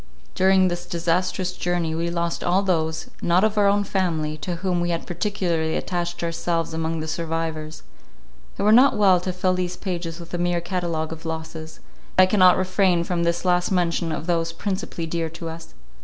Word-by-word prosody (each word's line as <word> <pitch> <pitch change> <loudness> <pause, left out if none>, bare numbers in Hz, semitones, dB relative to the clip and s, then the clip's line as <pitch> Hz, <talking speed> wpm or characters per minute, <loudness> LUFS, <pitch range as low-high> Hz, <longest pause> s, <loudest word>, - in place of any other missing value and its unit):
During 190 0 +4
this 175 0 -4
disastrous 180 +2 0
journey 175 -3 -1
we 165 +1 -1
lost 170 0 -2
all 185 +3 +2
those, 160 -4 -1
not 175 +3 +3
of 215 0 +2
our 205 -1 +4
own 205 +1 +3
family, 165 -6 -1
to 175 +3 -4
whom 180 0 -1
we 175 - 0
had 170 -1 -2
particularly 175 -4 -1
attached 175 -1 -3
ourselves 165 0 -1
among 160 0 -2
the 155 - -5
survivors. 160 -1 -3 0.7
It - - -2
were 210 - +5
not 250 +3 +6
well 190 -3 +5
to 185 +1 -3
fill 185 0 0
these 180 -1 -2
pages 175 -3 -4
with 170 0 -11
a 175 - -1
mere 175 0 +1
catalogue 170 -3 -2
of 160 - -11
losses; 160 -1 -6 0.4
yet 185 - +9
I - - +7
cannot 185 -2 +5
refrain 185 -1 +2
from 170 -1 -1
this 170 +2 -1
last 180 0 +2
mention 170 -2 +1
of 155 - -4
those 165 -1 0
principally 185 -2 -3
dear 165 0 -2
to 165 +1 -7
us. 165 - -10
175 Hz, 190 wpm, -23 LUFS, 165-185 Hz, 0.7 s, yet